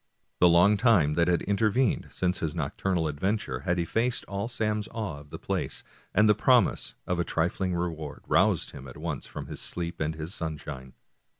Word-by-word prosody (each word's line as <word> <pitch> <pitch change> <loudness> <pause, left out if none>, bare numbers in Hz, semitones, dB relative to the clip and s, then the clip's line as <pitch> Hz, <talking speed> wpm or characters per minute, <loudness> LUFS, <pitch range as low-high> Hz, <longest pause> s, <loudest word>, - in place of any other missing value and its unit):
The 90 - +7
long 95 +5 +6
time 100 - +4
that 85 +2 +2
had 90 -1 +2
intervened 105 +4 +1
since 90 0 -1
his 80 -2 -2
noc - - -3
turnal 90 -4 0
adventure 75 - -1
had 85 +6 0
effaced 115 +8 0
all 100 +2 -3
Sam's 105 -3 -1
awe 105 -10 -4
of 75 0 -15
the - - -7
place, - - -3 0.3
and 105 +2 +4
the 105 - +7
promise - - +3
of 90 -1 -1
a - - +3
trifling 90 +3 -1
reward 80 -4 -4
roused - - +2
him 70 -1 -10
at 65 - -10
once 75 -3 -4
from - - -7
his - - -7
sleep 85 -1 -4
and 80 0 -1
his 80 +4 -5
sunshine. 75 -5 -6
85 Hz, 190 wpm, -28 LUFS, 80-100 Hz, 0.3 s, The